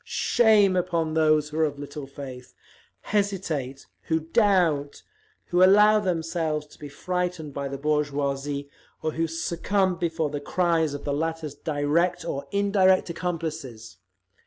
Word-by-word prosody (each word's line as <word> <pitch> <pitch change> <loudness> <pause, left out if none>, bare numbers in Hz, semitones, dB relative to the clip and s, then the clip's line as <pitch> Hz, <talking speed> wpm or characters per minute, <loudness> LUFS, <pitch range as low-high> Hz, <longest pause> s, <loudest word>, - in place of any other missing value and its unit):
Shame 215 -5 +3
upon 170 -3 0
those 155 -1 +3
who 155 +1 -4
are - - +4
of 145 -2 -1
little 145 0 -7
faith, 130 -3 -10 0.5
hesitate, 175 -10 -2 0.2
who 160 0 +1
doubt, 165 -6 +1 0.4
who 175 +1 +3
allow 210 +3 +6
themselves 165 -5 -1
to 150 - -19
be 145 - -8
frightened 180 0 -3
by 140 0 -3
the 140 0 -5
bourgeoisie, 145 -1 -1 0.4
or 155 - 0
who 165 +1 -1
succumb 175 +3 -1
before 165 -3 -1
the 145 -1 -4
cries 165 -2 +1
of 145 - -7
the 145 - -2
latter's 160 0 -3
direct 150 +4 0
or 140 - -4
indirect 195 -3 +3
accomplices! 160 - -5
160 Hz, 135 wpm, -25 LUFS, 145-180 Hz, 0.5 s, allow